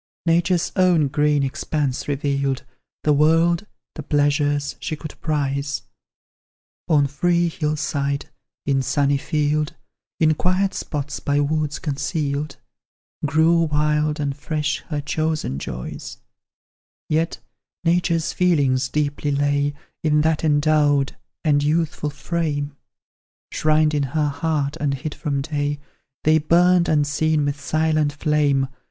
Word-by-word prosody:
Nature's 170 Hz, +1 st, +2 dB
own 180 Hz, -6 st, +4 dB
green 150 Hz, 0 st, +2 dB
expanse 135 Hz, 0 st, -2 dB
revealed 140 Hz, -2 st, -1 dB, 0.4 s
The 150 Hz, -, +4 dB
world, 165 Hz, +6 st, +3 dB, 0.3 s
the -, -, -6 dB
pleasures, 145 Hz, 0 st, +1 dB
she 155 Hz, -, -3 dB
could 155 Hz, 0 st, -8 dB
prize; 140 Hz, -3 st, -1 dB, 1.0 s
On 150 Hz, -4 st, +4 dB
free 170 Hz, +5 st, +1 dB
hill 155 Hz, -2 st, -1 dB
side, 140 Hz, -1 st, -2 dB, 0.4 s
in 135 Hz, -1 st, +2 dB
sunny 140 Hz, +1 st, +1 dB
field, 150 Hz, +1 st, 0 dB, 0.4 s
In 155 Hz, -1 st, +4 dB
quiet 185 Hz, +4 st, +1 dB
spots 145 Hz, -1 st, -4 dB
by 145 Hz, 0 st, 0 dB
woods 150 Hz, 0 st, 0 dB
concealed, 145 Hz, -1 st, -2 dB, 0.7 s
Grew 160 Hz, +3 st, +4 dB
wild 150 Hz, 0 st, +1 dB
and 140 Hz, -2 st, -1 dB
fresh 150 Hz, +1 st, -2 dB
her 150 Hz, -2 st, -2 dB
chosen 155 Hz, -, -2 dB
joys, 60 Hz, -2 st, -6 dB, 0.9 s
Yet 160 Hz, +2 st, 0 dB, 0.5 s
Nature's 170 Hz, -1 st, +1 dB
feelings 140 Hz, -8 st, +2 dB
deeply 145 Hz, 0 st, -1 dB
lay 145 Hz, 0 st, +1 dB, 0.3 s
In 150 Hz, -1 st, +3 dB
that 160 Hz, 0 st, +1 dB
endowed 145 Hz, -2 st, +2 dB, 0.3 s
and 145 Hz, -3 st, +3 dB
youthful 150 Hz, 0 st, 0 dB
frame; 145 Hz, -2 st, -2 dB, 0.8 s
Shrined 155 Hz, 0 st, +2 dB
in 145 Hz, -1 st, +1 dB
her 150 Hz, -1 st, +2 dB
heart 150 Hz, -1 st, -1 dB
and 140 Hz, -2 st, 0 dB
hid 145 Hz, +3 st, -5 dB
from 140 Hz, -3 st, -2 dB
day, 145 Hz, -1 st, -2 dB, 0.4 s
They 155 Hz, +1 st, +4 dB
burned 175 Hz, +3 st, +4 dB
unseen 150 Hz, 0 st, +2 dB
with 145 Hz, 0 st, -2 dB
silent 155 Hz, 0 st, +1 dB
flame. 145 Hz, -2 st, +1 dB
150 Hz, 120 wpm, -22 LUFS, 145-155 Hz, 1.0 s, own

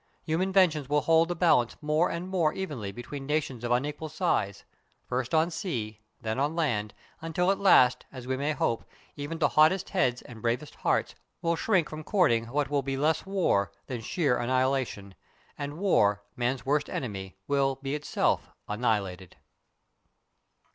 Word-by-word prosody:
Human 170 Hz, +4 st, 0 dB
inventions 165 Hz, -8 st, +3 dB
will 150 Hz, 0 st, +3 dB
hold 165 Hz, +1 st, +4 dB
the 175 Hz, -, -2 dB
balance 160 Hz, -9 st, +3 dB
more 155 Hz, +3 st, +1 dB
and 170 Hz, +2 st, -4 dB
more 175 Hz, -5 st, +1 dB
evenly 140 Hz, -, -4 dB
between 135 Hz, +5 st, -7 dB
nations 150 Hz, -5 st, -1 dB
of 120 Hz, -, -2 dB
unequal 150 Hz, +5 st, -1 dB
size, 155 Hz, -, -1 dB, 0.4 s
first 125 Hz, 0 st, -2 dB
on 160 Hz, +2 st, +3 dB
sea, 120 Hz, -, -4 dB, 0.2 s
then 110 Hz, +3 st, -3 dB
on 145 Hz, +3 st, 0 dB
land, 115 Hz, -11 st, -1 dB, 0.3 s
until 180 Hz, +3 st, +1 dB
at 195 Hz, -, -1 dB
last, 130 Hz, -10 st, +5 dB
as 130 Hz, -2 st, -9 dB
we 130 Hz, +1 st, -1 dB
may 140 Hz, +3 st, -1 dB
hope, 115 Hz, -5 st, 0 dB, 0.3 s
even 145 Hz, +3 st, -5 dB
the 160 Hz, -, +2 dB
hottest 160 Hz, +5 st, +4 dB
heads 130 Hz, -11 st, +1 dB
and 115 Hz, -3 st, -11 dB
bravest 120 Hz, +6 st, -1 dB
hearts -, -, 0 dB, 0.3 s
will 170 Hz, 0 st, +2 dB
shrink 185 Hz, -2 st, +2 dB
from 155 Hz, 0 st, -7 dB
courting 120 Hz, -, +2 dB
what 140 Hz, +3 st, 0 dB
will 145 Hz, -1 st, +2 dB
be 135 Hz, 0 st, -3 dB
less 155 Hz, +6 st, +1 dB
war 180 Hz, -, +1 dB
than 125 Hz, -3 st, -5 dB
sheer 130 Hz, 0 st, 0 dB
annihilation, 130 Hz, -5 st, 0 dB, 0.4 s
and 145 Hz, +1 st, -5 dB
war, 105 Hz, -, +2 dB
man's 125 Hz, +2 st, -1 dB
worst 145 Hz, +2 st, +1 dB
enemy, 95 Hz, -6 st, -5 dB
will 135 Hz, -1 st, +2 dB
be 135 Hz, +1 st, -5 dB
itself 150 Hz, 0 st, 0 dB, 0.2 s
annihilated. 105 Hz, -5 st, -2 dB
140 Hz, 160 wpm, -28 LUFS, 120-160 Hz, 0.4 s, last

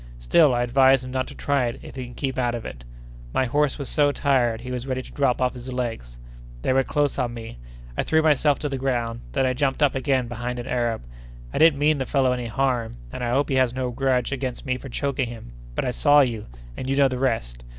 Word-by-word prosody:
Still 130 Hz, -, +4 dB
I 120 Hz, -, +1 dB
advise 130 Hz, +1 st, +4 dB
him 125 Hz, -, -7 dB
not 130 Hz, 0 st, -1 dB
to -, -, -10 dB
try 140 Hz, -3 st, +1 dB
it 115 Hz, -, -5 dB
if -, -, -10 dB
he 130 Hz, -1 st, -5 dB
can 125 Hz, -, -11 dB
keep 135 Hz, -2 st, -2 dB
out 120 Hz, -1 st, +1 dB
of 115 Hz, -, -6 dB
it! -, -, -8 dB, 0.5 s
My 130 Hz, -, +3 dB
horse 145 Hz, +3 st, +1 dB
was 140 Hz, -3 st, -5 dB
so 145 Hz, -2 st, +3 dB
tired, 125 Hz, -6 st, +1 dB
he 125 Hz, +1 st, -6 dB
was 125 Hz, +1 st, -4 dB
ready 130 Hz, -1 st, -2 dB
to -, -, -13 dB
drop 135 Hz, -4 st, +1 dB
off 125 Hz, -1 st, +1 dB
his 125 Hz, 0 st, -8 dB
legs; 115 Hz, -, -4 dB, 0.5 s
they -, -, +2 dB
were 135 Hz, 0 st, +3 dB
close 145 Hz, +1 st, 0 dB
on 120 Hz, -1 st, -1 dB
me; 115 Hz, -, -8 dB, 0.4 s
I -, -, +1 dB
threw 160 Hz, 0 st, +2 dB
myself 150 Hz, -2 st, +3 dB
to 150 Hz, -, -2 dB
the 135 Hz, -1 st, -3 dB
ground; 120 Hz, -3 st, -1 dB
then 135 Hz, -2 st, +2 dB
I 130 Hz, -, +1 dB
jumped 135 Hz, +2 st, 0 dB
up 145 Hz, -, +4 dB
again 130 Hz, -2 st, 0 dB
behind 120 Hz, +1 st, -4 dB
an 120 Hz, -, -5 dB
Arab! 120 Hz, -, -1 dB, 0.5 s
I -, -, -1 dB
didn't 160 Hz, -3 st, +6 dB
mean 150 Hz, +1 st, +2 dB
the 130 Hz, -, -2 dB
fellow 135 Hz, -3 st, +2 dB
any 125 Hz, -1 st, -2 dB
harm, 120 Hz, -, -1 dB, 0.2 s
and -, -, -4 dB
I 120 Hz, -, 0 dB
hope 135 Hz, +4 st, +1 dB
he 135 Hz, -, +1 dB
has 130 Hz, -1 st, +2 dB
no 130 Hz, -1 st, -2 dB
grudge 130 Hz, 0 st, 0 dB
against 130 Hz, -1 st, -4 dB
me 130 Hz, -1 st, 0 dB
for 135 Hz, +2 st, -8 dB
choking 135 Hz, -1 st, -1 dB
him, 115 Hz, -, -9 dB, 0.2 s
but -, -, -1 dB
I 125 Hz, -, 0 dB
saw 145 Hz, +3 st, +5 dB
you—and 105 Hz, -, -4 dB
you 135 Hz, -, +1 dB
know 140 Hz, 0 st, +5 dB
the 130 Hz, -1 st, -3 dB
rest. -, -, -1 dB
130 Hz, 250 wpm, -24 LUFS, 120-135 Hz, 0.5 s, didn't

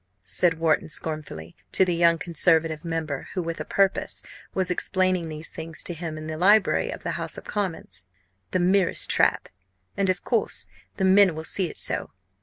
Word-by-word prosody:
'" 95 Hz, 0 st, -38 dB
said 170 Hz, -, +4 dB
Wharton, 160 Hz, -1 st, +1 dB
scornfully, 150 Hz, -, -5 dB, 0.2 s
to 190 Hz, -, +4 dB
the 180 Hz, -, 0 dB
young 170 Hz, 0 st, +4 dB
Conservative 160 Hz, -2 st, +1 dB
member 160 Hz, -4 st, -3 dB
who, 185 Hz, -, 0 dB
with 165 Hz, 0 st, -4 dB
a -, -, -4 dB
purpose, 195 Hz, -1 st, 0 dB, 0.3 s
was 185 Hz, -1 st, -1 dB
explaining 185 Hz, -2 st, 0 dB
these 155 Hz, +1 st, -7 dB
things 160 Hz, 0 st, -8 dB
to 175 Hz, -, -4 dB
him 160 Hz, -1 st, -5 dB
in 155 Hz, -, -7 dB
the 155 Hz, 0 st, -5 dB
library 205 Hz, +3 st, +4 dB
of -, -, -7 dB
the -, -, -2 dB
House -, -, -3 dB
of -, -, -8 dB
Commons, 170 Hz, -, -4 dB, 0.5 s
"the -, -, 0 dB
merest 185 Hz, +1 st, +2 dB
trap! -, -, +2 dB, 0.5 s
and, 195 Hz, -1 st, 0 dB
of 185 Hz, -1 st, -1 dB
course, 230 Hz, -4 st, -1 dB, 0.3 s
the 190 Hz, -, +1 dB
men 190 Hz, -2 st, +5 dB
will 160 Hz, -, -5 dB
see 185 Hz, +3 st, 0 dB
it -, -, -7 dB
so. -, -, +1 dB
170 Hz, 190 wpm, -25 LUFS, 160-185 Hz, 0.5 s, men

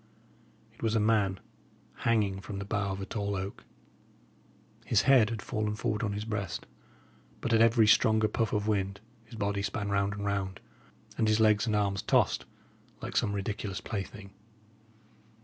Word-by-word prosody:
It -, -, -20 dB
was 115 Hz, -1 st, +1 dB
a -, -, +4 dB
man 105 Hz, -3 st, +2 dB, 0.6 s
hanging 105 Hz, -4 st, +1 dB
from 100 Hz, 0 st, -6 dB
the 100 Hz, -, -4 dB
bough 100 Hz, -1 st, -1 dB
of 95 Hz, -, -6 dB
a -, -, -3 dB
tall 100 Hz, -1 st, -2 dB
oak. 95 Hz, +1 st, -5 dB, 1.2 s
His 105 Hz, -3 st, +2 dB
head 125 Hz, -5 st, +5 dB
had 110 Hz, -3 st, -4 dB
fallen 110 Hz, -2 st, -2 dB
forward 110 Hz, 0 st, -1 dB
on 105 Hz, -3 st, -1 dB
his 105 Hz, +1 st, -4 dB
breast; 105 Hz, -5 st, -3 dB, 0.7 s
but 120 Hz, -, -1 dB
at 115 Hz, -, +5 dB
every 115 Hz, 0 st, +5 dB
stronger 110 Hz, 0 st, +4 dB
puff 110 Hz, 0 st, -1 dB
of 105 Hz, 0 st, -1 dB
wind 100 Hz, -2 st, 0 dB, 0.3 s
his 115 Hz, -, -12 dB
body 100 Hz, -2 st, -1 dB
span 100 Hz, 0 st, -2 dB
round 100 Hz, 0 st, +1 dB
and 100 Hz, 0 st, -5 dB
round, 100 Hz, -1 st, -2 dB, 0.6 s
and 110 Hz, -, +3 dB
his 110 Hz, 0 st, +3 dB
legs 110 Hz, +1 st, +4 dB
and 110 Hz, -, +1 dB
arms 100 Hz, -2 st, +1 dB
tossed, -, -, +2 dB, 0.5 s
like -, -, -6 dB
some 100 Hz, -, +2 dB
ridiculous 100 Hz, 0 st, -3 dB
plaything. 100 Hz, -1 st, -6 dB
105 Hz, 165 wpm, -30 LUFS, 100-110 Hz, 1.2 s, head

